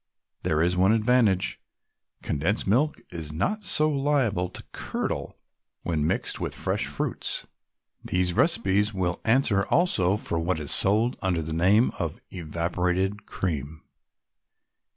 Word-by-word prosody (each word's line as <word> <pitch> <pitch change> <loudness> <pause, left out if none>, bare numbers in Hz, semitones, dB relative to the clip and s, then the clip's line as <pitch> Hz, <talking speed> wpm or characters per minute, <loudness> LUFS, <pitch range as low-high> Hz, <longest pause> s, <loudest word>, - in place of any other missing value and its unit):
There 80 +1 +1
is 90 +1 +1
one 95 +4 +4
advantage 110 -4 +2 0.6
condensed 85 +10 -1
milk 130 +10 +1
is 80 -3 -6
not 180 - -1
so 155 -6 +3
liable 135 -11 0
to - - -10
curdle - - -4 0.5
when 80 -3 -1
mixed - - -1
with - - -2
fresh - - -1
fruits. - - -2 0.6
These 90 -1 0
recipes 105 - +1
will 90 -2 -2
answer 110 -4 +3
also 105 - +2
for 85 -5 -2
what 85 0 -1
is 75 - 0
sold 110 +6 +4
under 90 -5 0
the 80 +1 -5
name 95 +9 +3
of 85 -4 -3
"Evaporated 90 +4 -2
Cream." 75 -4 -4
95 Hz, 130 wpm, -26 LUFS, 85-110 Hz, 0.6 s, one